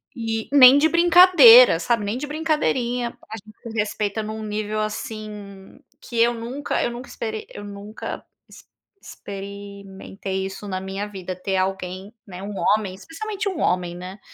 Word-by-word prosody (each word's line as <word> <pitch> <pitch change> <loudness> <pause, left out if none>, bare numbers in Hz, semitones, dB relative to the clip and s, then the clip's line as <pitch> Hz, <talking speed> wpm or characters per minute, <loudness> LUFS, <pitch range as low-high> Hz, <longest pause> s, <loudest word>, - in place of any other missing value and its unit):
E 225 -2 -3
nem 265 0 +9
de 310 +2 +4
brincadeira, 330 - +7
sabe, 230 0 0
nem 215 +5 -2
de 295 - -5
brincadeirinha, 260 -6 -1
a - - -4
gente 215 +1 -16
se 230 - -9
respeita 210 0 -2
em 215 - -6
um 220 0 -6
nível, 215 0 -3
assim, 210 -2 -7 0.2
que 235 -2 -5
eu 240 +1 +4
nunca 250 +6 -3
eu 240 - -1
nunca 245 +2 -9
esperei 220 -1 -6
eu 205 - -10
nunca 205 +2 -8 0.3
ex - - -15 0.4
experimentei 200 -1 -7
isso 195 +2 -8
na 185 -1 -3
minha 195 +2 -5
vida 185 -2 -7
ter 190 +1 -3
alguém, 190 +2 -3
né, 185 0 -9
um 205 - -6
homem 205 -3 +1
especialmente 395 - -5
um 350 -5 -5
homem, 175 -1 0
né. 185 +3 -9
215 Hz, 165 wpm, -22 LUFS, 195-240 Hz, 0.4 s, nem